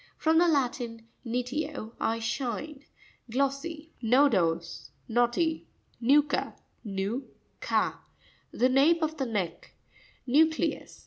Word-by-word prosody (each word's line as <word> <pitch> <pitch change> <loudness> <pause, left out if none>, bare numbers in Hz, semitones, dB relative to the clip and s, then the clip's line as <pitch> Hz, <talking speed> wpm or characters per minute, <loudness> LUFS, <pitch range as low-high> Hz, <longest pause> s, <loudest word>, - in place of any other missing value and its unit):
—From 320 0 +3
the 350 - +5
Latin, 245 -6 -1 0.2
niteo, 250 0 -3
I 225 - 0
shine. 265 +5 -4 0.4
Glossy. 280 +5 -2
Nopo'sr.— 205 - +2 0.2
Knotty. 245 +8 +1 0.3
No'cua 285 +4 +2 0.3
(nu 205 +5 -3 0.3
ka).—The 250 - -2
nape 305 +6 +4
of 315 0 -1
the 265 -3 -1
neck, 200 -7 -4 0.5
Nvu'crevs. 315 +5 +1
265 Hz, 90 wpm, -28 LUFS, 230-300 Hz, 0.5 s, the